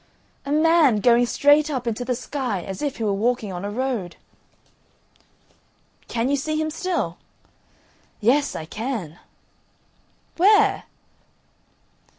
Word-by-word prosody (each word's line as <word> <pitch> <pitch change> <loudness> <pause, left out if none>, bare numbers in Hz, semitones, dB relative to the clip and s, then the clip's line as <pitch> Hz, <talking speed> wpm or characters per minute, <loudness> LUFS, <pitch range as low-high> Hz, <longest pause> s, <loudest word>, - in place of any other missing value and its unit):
"A - - -3
man 310 -4 +4
going 240 +3 +4
straight 290 +4 +3
up 260 -4 -3
into 235 +1 -2
the 250 0 -1
sky, 250 -6 -4
as 190 -1 -7
if 285 -2 -2
he 230 - -4
were 205 -2 +1
walking 220 -1 -1
on 180 +1 -6
a 200 - -3
road." 230 -6 -3 1.9
"Can 230 +1 -1
you 285 - +2
see 310 +2 -2
him 315 0 -1
still?" 365 +3 -2 1.0
"Yes, 275 +6 +2
I 160 - -5
can." 210 - -5 1.2
"Where?" 410 +3 +4
250 Hz, 125 wpm, -23 LUFS, 215-295 Hz, 1.9 s, man